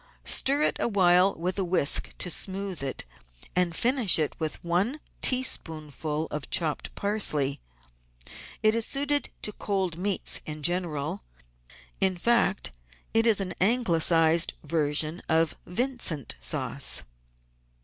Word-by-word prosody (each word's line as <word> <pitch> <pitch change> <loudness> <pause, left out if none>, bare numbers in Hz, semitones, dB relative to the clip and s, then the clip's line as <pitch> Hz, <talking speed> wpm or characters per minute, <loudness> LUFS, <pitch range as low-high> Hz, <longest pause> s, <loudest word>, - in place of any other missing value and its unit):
Stir 280 +3 +3
it - - 0
awhile 185 -3 +3
with 180 +4 -2
a - - +1
whisk 175 -5 0
to 180 - -3
smooth 190 -2 -2
it, 135 -1 -5 0.5
and 180 -2 +1
finish 240 -6 +3 0.2
with 155 -2 -2
one 190 - 0 0.2
teaspoonful 155 - +1
of 150 -1 -5
chopped 155 -4 -1
parsley. 155 -10 +2 1.0
It 215 0 +4
is 230 0 0
suited 285 +3 +2
to 210 - -2
cold 190 -5 -3
meats 195 0 0
in 155 -1 -6
general; 155 - -2 0.8
in 190 -1 +1
fact, 235 - +1 0.4
it 225 +1 +3
is 220 -3 +3
an 185 -2 -4
Anglicised 170 -7 +3
version 155 +1 0
of 160 0 +2
Vincent 180 - 0
Sauce. - - 0
180 Hz, 120 wpm, -26 LUFS, 160-210 Hz, 1.0 s, It